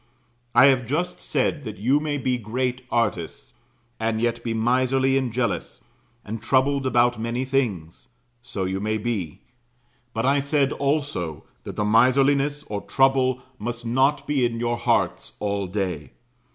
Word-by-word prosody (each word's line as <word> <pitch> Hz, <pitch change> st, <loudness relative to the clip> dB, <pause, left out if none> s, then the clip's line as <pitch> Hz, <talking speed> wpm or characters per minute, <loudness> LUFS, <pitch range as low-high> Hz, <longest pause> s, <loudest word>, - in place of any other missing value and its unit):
I -, -, +8 dB
have 130 Hz, -4 st, +3 dB
just 175 Hz, +7 st, -2 dB
said, 150 Hz, -, -1 dB
that 110 Hz, -4 st, -7 dB
you 130 Hz, +8 st, +2 dB
may 150 Hz, -1 st, -2 dB
be 130 Hz, -2 st, -1 dB
great 125 Hz, +3 st, -2 dB
artists, 105 Hz, -9 st, -2 dB, 0.5 s
and 110 Hz, 0 st, 0 dB
yet 115 Hz, 0 st, -1 dB
be 115 Hz, -, -2 dB
miserly 130 Hz, +4 st, +2 dB
and 130 Hz, -3 st, 0 dB
jealous, 115 Hz, -4 st, -2 dB, 0.4 s
and 110 Hz, +1 st, -5 dB
troubled 135 Hz, +2 st, +2 dB
about 120 Hz, -1 st, +3 dB
many 120 Hz, +3 st, -2 dB
things. 110 Hz, -12 st, -2 dB, 0.3 s
So 100 Hz, -5 st, -4 dB
you 95 Hz, +1 st, -2 dB
may 110 Hz, +2 st, -1 dB
be; 105 Hz, -8 st, -3 dB, 0.7 s
but 115 Hz, +1 st, -2 dB
I 140 Hz, +2 st, +3 dB
said 140 Hz, -1 st, +1 dB
also 140 Hz, -, -2 dB, 0.2 s
that -, -, -6 dB
the 105 Hz, -, -1 dB
miserliness 135 Hz, +6 st, +3 dB
or 105 Hz, -5 st, -5 dB
trouble 135 Hz, -1 st, +2 dB, 0.2 s
must 120 Hz, +2 st, -4 dB
not 135 Hz, +4 st, +2 dB
be 145 Hz, -3 st, +1 dB
in 115 Hz, -1 st, 0 dB
your 120 Hz, 0 st, 0 dB
hearts -, -, 0 dB
all 100 Hz, -2 st, -1 dB
day. 90 Hz, -5 st, -3 dB
120 Hz, 150 wpm, -24 LUFS, 110-135 Hz, 0.7 s, I